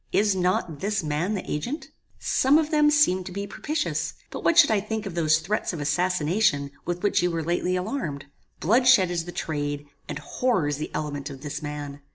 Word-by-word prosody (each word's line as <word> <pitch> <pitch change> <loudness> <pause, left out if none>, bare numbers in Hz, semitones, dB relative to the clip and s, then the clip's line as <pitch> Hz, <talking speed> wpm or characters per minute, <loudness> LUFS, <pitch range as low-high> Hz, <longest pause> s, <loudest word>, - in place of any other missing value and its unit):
Is 205 -1 +3
not 180 -4 0
this 200 0 -1
man 155 +7 -1
the 190 - -4
agent? 245 - -4 0.3
Some 270 +3 +3
of 315 0 0
them 300 -1 +5
seem 240 -12 +3
to 180 - -8
be 200 +2 -4
propitious; 305 +9 -2 0.2
but - - -6
what 335 - +3
should 320 -8 +8
I 215 - +3
think 220 +1 -4
of 195 - -5
those 155 -2 +3
threats 185 +5 -2
of 165 - -5
assassination 155 -1 +1
with 175 0 -3
which 205 - +3
you 180 - +2
were 165 -1 -2
lately 175 +2 0
alarmed? 180 - -3 0.3
Bloodshed 225 -2 +5
is 170 -2 -2
the 175 - -6
trade, 145 -3 -3 0.2
and - - -3
horror 235 -12 0
is 145 -1 -1
the 155 - -4
element 145 -1 -3
of 135 -2 -9
this 150 0 -5
man. 145 -1 -6
180 Hz, 205 wpm, -25 LUFS, 150-215 Hz, 0.3 s, should